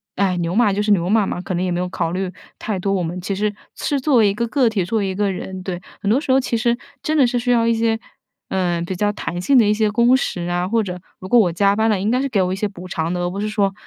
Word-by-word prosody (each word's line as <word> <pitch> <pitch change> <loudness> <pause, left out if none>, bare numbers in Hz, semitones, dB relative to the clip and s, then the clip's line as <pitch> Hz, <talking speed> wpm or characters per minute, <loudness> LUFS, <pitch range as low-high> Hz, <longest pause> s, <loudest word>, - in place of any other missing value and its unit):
哎， 190 -2 +1
牛 170 +1 -2
马 225 -2 +4
就 200 +1 0
是 210 0 +1
牛 180 -3 +2
马 215 0 +3
嘛， 180 - -3
可 185 - -4
能 175 - -1
也 - - -1
没 175 0 -1
有 180 - -2
考 165 - -2
虑 185 0 -2 0.3
太 210 -4 -3
多， 195 +2 0
我 185 -2 0
们 170 +2 -4
其 195 +2 -3
实 210 +1 -1 0.2
是 285 - -1
作 275 +1 +1
为 220 -4 +5
一 - - 0
个 235 +3 -2
个 255 0 +2
体， 200 -5 -1
作 220 +5 0
为 200 - -1
一 - - -2
个 200 +1 0
人。 190 0 -6
对， 185 -1 -5 0.2
很 200 - -1
多 245 +7 +3
时 275 - -1
候， 265 - +5
其 255 -2 -2
实 235 +1 +1 0.3
真 310 +1 0
的 270 -4 +5
是 245 - -1
需 245 +1 0
要 230 -1 +3
一 230 - +3
些， 225 0 +1 0.5
呃， 175 -3 0
比 185 +2 -4
较 205 +3 +1
弹 175 -3 -4
性 270 +8 +4
的 230 - +6
一 210 - +4
些 215 0 +1
工 235 +4 +4
时 175 -9 -3
啊， 175 0 0
或 225 +3 +2
者， 180 -2 -5 0.2
如 185 - -8
果 245 - +5
我 185 -6 +3
加 200 +3 +3
班 220 +1 +2
了， 210 -3 +2
应 200 +3 0
该 250 +2 +2
是 275 - -1
给 210 -6 +1
我 185 0 0
一 - - -1
些 195 - -2
补 185 -2 -10
偿 165 -1 -2
的， 180 - -2
而 175 - 0
不 190 +3 -5
是 210 - -1
说 200 -2 +1
200 Hz, 345 characters per minute, -20 LUFS, 180-230 Hz, 0.5 s, 的